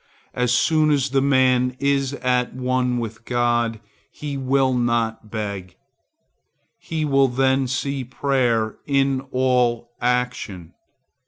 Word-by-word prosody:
As 125 -1 0
soon 155 +5 +3
as 140 -3 +1
the 135 0 +2
man 130 -2 +3
is 140 0 0
at 125 -2 0
one 125 -1 0
with 115 -1 -5
God, 120 -2 0 0.3
he 145 -2 -6
will 135 0 +1
not 120 -3 -1
beg. 100 -5 -5 1.0
He 160 -2 -3
will 135 -2 +3
then 130 +1 +1
see 135 +1 -2
prayer 125 -4 0
in 135 -2 +1
all 125 -2 +1
action. 120 -8 -2
125 Hz, 115 wpm, -22 LUFS, 120-135 Hz, 1.0 s, soon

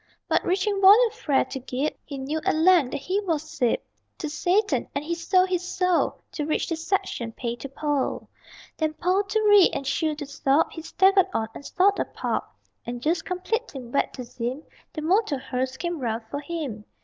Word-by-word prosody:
But - - +2
reaching 390 +2 0
volume 425 +5 +7
Fra 305 - +1
to 265 +1 -6
Gib, 260 +3 -2
He 280 - -7
knew 290 +4 -3
at - - +2
length 325 -4 +5
that 270 - -4
he 370 +7 0
was 325 -6 -2
sib 290 -7 0 0.4
To 310 - -4
Satan; 365 +7 +1
and 285 - -2
he 340 - -1
sold 365 +2 +2
his 360 -2 0
soul 365 -1 0
To 300 - -3
reach 305 +1 -1
the 330 - -1
section 325 - -2
Pay 235 0 -3
to 275 +3 -7
Pol. 290 0 -2 0.5
Then 310 -1 -1
Pol 370 +5 +2
to 415 +3 0
Ree, 415 -3 +7
and 275 - -4
Shu 310 +2 0
to 295 -1 -6
Sub 280 +2 +1
He 325 - -7
staggered 385 +3 +4
on, 220 0 0
and - - -9
sought 395 +6 +2
a - - +1
pub. - - -2 0.4
And 240 0 -5
just 320 +7 0
completing 365 - -3
Vet 280 - +1
to 255 - -6
Zym, 245 +4 -5 0.3
The 310 - -5
motor 365 -2 +2
hearse 260 0 -3
came 345 0 -3
round 230 -3 -2
for 285 - -2
him. 285 -9 -5
315 Hz, 195 wpm, -25 LUFS, 270-370 Hz, 0.5 s, volume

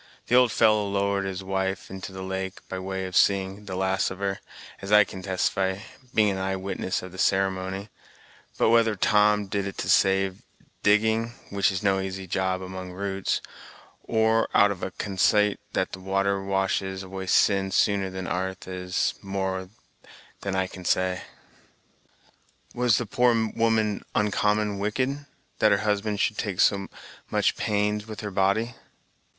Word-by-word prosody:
The 125 - +4
old 125 -2 +6
fellow 110 -2 +3
lowered 100 0 0
his 95 0 -4
wife 95 0 -2
into 95 0 -7
the 95 0 -7
lake, 95 0 -5
by 95 - -5
way 95 0 -4
of 90 -1 -6
seeing 100 +2 +2
the 95 -2 -5
last 95 0 +1
of 95 - -7
her, 100 0 -2 0.4
as 100 +1 -6
I 105 0 +8
can 95 -1 -9
testify, 95 0 0 0.3
being 105 -3 +3
an 95 - -3
eye 95 0 -1
witness 95 -1 -3
of 90 - -8
the 95 - -11
ceremony; 95 +1 0 0.7
but - - +3
whether 115 -2 +4
Tom 105 +1 +3
did 100 0 -2
it 95 - -7
to - - -3
save 95 -1 +3 0.4
digging, 110 +3 +2 0.2
which 100 0 +2
is 95 +1 -3
no 95 -1 +2
easy 95 0 -4
job 95 0 -1
among 95 -1 -7
roots, 95 0 -2 0.6
or 110 0 +2
out 100 0 +6
of 95 - -6
a - - -2
consait 100 +2 +1
that 95 - -1
water 95 +1 0
washes 95 0 -1
away 95 0 -7
sin 95 0 +3
sooner 100 0 +2
than 95 0 -6
'arth, 95 +2 -3
is 90 0 -1
more 95 -1 -3 0.7
than 100 -1 -3
I 95 0 +1
can 90 0 -10
say." 95 0 +1 1.5
"Was 120 -3 +3
the 120 - -1
poor 120 +3 +3 0.2
woman 110 -2 +1
oncommon 105 0 +1
wicked, 130 +7 -1 0.3
that 110 - +5
her 100 - +5
husband 105 0 0
should 105 - 0
take 100 -3 -3
so 100 -2 +3 0.4
much - - +1
pains 105 +1 0
with 110 +2 -7
her 105 -1 -5
body?" 100 +5 +1
95 Hz, 160 wpm, -26 LUFS, 95-105 Hz, 1.5 s, I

